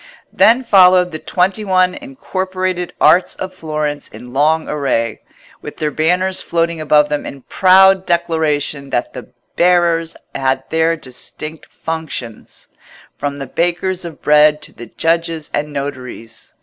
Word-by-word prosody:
Then 245 +3 +4
followed 185 -4 +5
the 155 - -6
twenty 190 +5 0
one 185 -2 +2
incorporated 185 - -4
Arts 180 - +4
of 185 0 -6
Florence 150 -4 -4
in 120 +3 -12
long 155 +3 +2
array, 130 -6 -1 0.4
with - - -9
their 150 -1 -1
banners 180 +5 +1
floating 170 -1 -1
above 150 -1 +3
them 150 0 -2
in 135 -2 -9
proud 190 0 +4
declaration 155 -4 -1
that 120 - -2
the 125 - -9 0.3
bearers 170 -2 +2 0.2
had 135 0 -1
their 160 +1 +1
distinct 155 +3 -5
functions, 160 -8 -7 0.5
from 145 0 -4
the 135 - -5
bakers 175 +5 -1
of 170 -3 -9
bread 150 0 +5
to - - -6
the 120 - -10
judges 165 +3 -1
and 150 +1 -2
notaries. 130 -5 -7
160 Hz, 135 wpm, -17 LUFS, 145-180 Hz, 0.5 s, followed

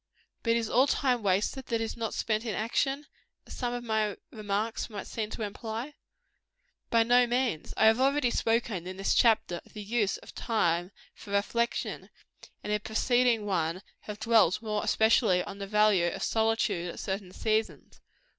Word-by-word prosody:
But 230 - +2
is 230 -1 0
all 255 +5 +4
time 255 -3 +1
wasted 205 +7 0
that 230 -1 0
is 225 -1 -3
not 225 -2 -3
spent 215 0 -1
in 225 -3 -3
action, 270 +6 -1 0.4
as - - -10
some 245 -2 -2
of 245 0 -4
my 215 -3 0
remarks 215 +2 -2
might 205 -3 -6
seem 215 -2 -4
to 220 - -5
imply? 225 +6 -5 1.0
By 230 -1 +4
no 245 +1 +4
means. 240 -9 -1
I - - +4
have 220 +2 +5
already 270 -1 +2
spoken, 225 -7 0
in 185 0 -6
this 195 - +1
chapter, 220 -7 +3
of - - -22
the 210 - -7
use 210 -1 0
of - - -14
time 175 -5 0 0.2
for - - -14
reflection; 235 +4 -1 0.5
and 210 - -4
in - - +3
a - - -13
preceding 235 +1 +1
one, 180 -1 -1 0.2
have 210 0 -8
dwelt 220 -4 +4
more 210 -1 -2
especially 220 -4 +3
on 200 0 -9
the 200 - -5
value 210 -4 +3
of 175 - -3
solitude 220 -5 0
at - - -10
certain 190 -1 -4
seasons. 220 +3 -2
220 Hz, 175 wpm, -29 LUFS, 200-235 Hz, 1.0 s, have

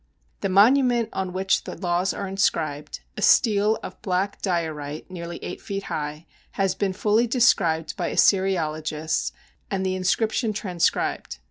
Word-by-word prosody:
The 195 - -1
monument 235 +3 +4
on 190 -1 -2
which 190 +1 0
the - - -6
laws 180 0 0
are 200 - -4
inscribed, 155 -6 -1 0.2
a - - -4
stele 215 -2 +4
of - - -9
black 190 +1 -1
diorite 160 -4 -3
nearly 170 -1 -6
eight - - -6
feet 195 0 -4
high, 150 +2 -4 0.3
has 195 -2 +1
been 195 -2 -1
fully 215 +5 +2
described 195 -10 +2
by - - -1
Assyriologists, 155 -5 +1 0.4
and 190 -1 -1
the 185 - 0
inscription 215 +4 0
transcribed. 180 - -1
190 Hz, 140 wpm, -24 LUFS, 165-205 Hz, 0.4 s, monument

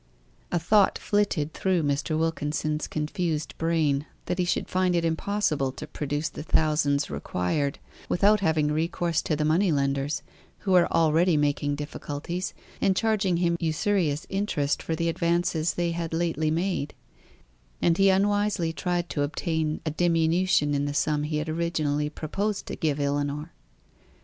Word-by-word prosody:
A 175 - +2
thought 195 +4 +3
flitted 195 -7 0
through 185 -4 +1
Mr. 145 +2 0
Wilkins's 155 -1 -1
confused 155 0 -2
brain 155 -3 +1 0.2
that 180 +1 -2
he 180 - +2
should 175 - -1
find 185 -1 +1
it 170 -1 +1
impossible 160 -5 0
to - - -7
produce 150 +1 -3
the - - -7
thousands 150 -2 +1
required 140 +11 -1 0.3
without 205 +3 +4
having 155 -5 +1
recourse 165 +1 0
to 155 - -1
the 150 0 0
money 170 +4 +3
lenders, 140 0 0 0.4
who 195 - -2
were 180 -2 +5
already 165 +1 +3
making 145 0 +1
difficulties, 150 +4 -5 0.3
and 190 - +3
charging 200 -4 +1
him 170 -1 +2
usurious 160 -2 0
interest 195 -8 -1
for 160 - -2
the 170 +1 -1
advances 170 -1 0
they 175 -1 0
had 165 -1 -3
lately 165 -2 0
made; 165 -2 -1 0.8
and 170 +1 +2
he 195 0 +6
unwisely 200 -3 +2
tried 175 +3 -1
to 145 - -1
obtain 155 +1 -1
a 155 - 0
diminution 165 -1 +2
in 140 0 0
the 145 0 -3
sum 150 0 +1
he 150 +1 -2
had 150 +1 -2
originally 155 -3 -1
proposed 195 +7 -3
to - - -5
give 150 -2 -1
Ellinor. 145 +2 -2
160 Hz, 150 wpm, -26 LUFS, 150-175 Hz, 0.8 s, he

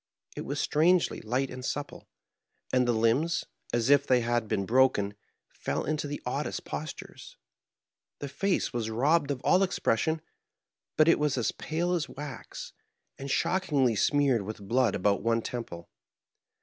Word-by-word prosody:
It - - -5
was 145 +1 -2
strangely 170 +5 +2
light 125 +4 -1
and 125 0 -7
supple, 145 +2 -5 0.7
and 125 -1 +3
the - - +4
limbs, 120 +9 +1 0.3
as 120 +3 +1
if 140 0 +5
they 125 -1 +4
had 120 -1 0
been 105 -2 -1
broken, 115 -4 +3 0.4
fell - - -3
into 155 -1 -1
the 145 0 -4
oddest 140 +4 -3
postures. 155 -1 -7 0.8
The 145 - -5
face 185 +6 -1
was 115 -2 -2
robbed 145 +7 +2
of 135 -3 -2
all 185 - +4
expression; 160 -4 +1 0.8
but 155 - +5
it 165 - +5
was 150 -3 +1
as 120 - +1
pale 170 +3 -2
as 170 -4 -1
wax, 145 -3 -8 0.5
and 140 +1 -6
shockingly 150 -7 +1
smeared 135 +1 +2
with 100 0 -7
blood 120 -1 +2
about 100 +1 +1
one 115 0 +1
tem 120 -2 -4
ple. 85 0 -10
130 Hz, 155 wpm, -29 LUFS, 115-150 Hz, 0.8 s, if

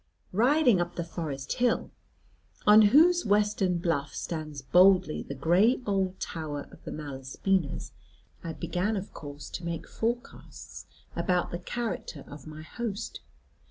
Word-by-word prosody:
Riding 245 - +4
up 175 0 -3
the 170 - -2
forest 155 -5 -4
hill, 245 -1 +1 0.7
on 210 +1 +8
whose 345 +8 +6
western 205 -3 +2
bluff 155 -5 -1
stands 155 -4 -5
boldly 180 0 +5
the 140 - -7
gray 180 - +3
old 190 -2 0
tower 150 -3 -5
of - - -16
the - - -5
Malaspinas, 145 +4 -2 0.5
I 165 - -4
began 185 +8 -1
of 195 - -6
course 145 -2 -8
to 180 - -6
make 170 -1 -4
forecasts 240 +3 -5 0.3
about 175 +1 0
the 175 - -3
character 185 -7 -4
of 145 -1 -11
my 155 0 -9
host. 225 +4 -5
175 Hz, 135 wpm, -28 LUFS, 155-210 Hz, 0.7 s, on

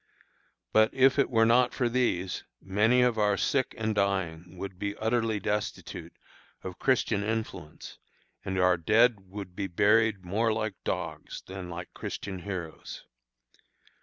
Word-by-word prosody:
But 110 0 +5
if 135 +1 +4
it 140 - +3
were 115 -2 +4
not 120 +2 +4
for 125 - +1
these, 115 -7 0 0.2
many 110 +6 +3
of 120 -3 +2
our 105 -1 +3
sick 130 -2 0
and 110 -1 -1
dying 95 -4 -1
would 95 -1 -7
be 100 0 -2
utterly 110 -1 0
destitute 105 +1 -3 0.5
of 90 -1 -7
Christian 115 -5 +1
influence, 110 -8 -5 0.4
and 95 -1 -3
our 90 -1 +4
dead 110 +2 +3
would 95 -2 -8
be 100 0 -2
buried 105 +2 +3
more 110 +5 +1
like 110 -1 -1
dogs 80 -5 -4
than 95 -1 -7
like 85 0 -7
Christian 95 -2 -5
heroes. 90 -4 -6
100 Hz, 140 wpm, -28 LUFS, 95-115 Hz, 0.5 s, But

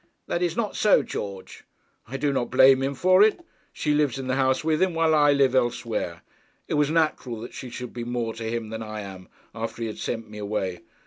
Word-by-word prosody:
'That 170 - -2
is 175 -2 0
not 220 -3 -1
so, 210 - +4
George.' 100 -2 -7 0.4
'I 135 +4 -5
do 140 +1 0
not 125 -3 -1
blame 130 0 +6
him 135 +1 -1
for 185 +6 +4
it. 220 +11 +3 0.3
She 150 - -1
lives 145 -3 +1
in 135 - -5
the 130 - -1
house 130 0 +1
with 155 -1 +1
him, 185 -3 +2
while 165 -1 +3
I 145 -1 +5
live 140 -2 +3
elsewhere. 115 -8 -1 0.4
It - - -3
was 150 -1 +2
natural 155 -7 0
that 120 - -8
she 130 - -7
should 125 0 -7
be 120 - -5
more 120 -1 -2
to 115 - -7
him 115 -1 -3
than 110 0 -5
I 110 -1 -5
am, 95 -2 -9 0.3
after 115 +1 -5
he - - -1
had 110 - -7
sent 115 -2 -3
me 105 0 -10
away. 100 -3 -3
130 Hz, 230 wpm, -25 LUFS, 115-150 Hz, 0.4 s, blame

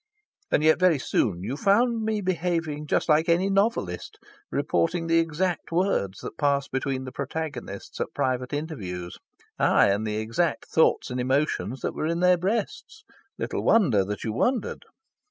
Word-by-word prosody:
And 150 - +2
yet 155 +1 +5
very 180 -4 +4
soon 95 -8 0
you 120 +7 -3
found 225 - +2
me 215 -1 -1
behaving 170 -5 -2
just - - +1
like 160 +2 +3
any 180 +4 +3
novelist 195 - 0 0.3
reporting 165 - 0
the 165 0 +3
exact 165 +2 -1
words 165 - 0
that - - -8
passed 140 -1 +1
between 130 0 -2
the 130 - -7
protagonists 155 +2 -5
at - - -2
private 125 -1 -1
interviews 100 - -5 0.4
aye, - - +4
and 100 +2 0
the 105 0 -2
exact 115 +10 -1
thoughts 160 - +2
and 125 - -3
emotions 130 -1 0
that - - -2
were 155 - -2
in 170 +1 -1
their 180 0 +4
breasts. 220 - -3 0.3
Little - - -3
wonder 135 - +4
that 105 +2 -5
you 110 - -2
wondered! 240 - -1
155 Hz, 160 wpm, -26 LUFS, 125-180 Hz, 0.4 s, yet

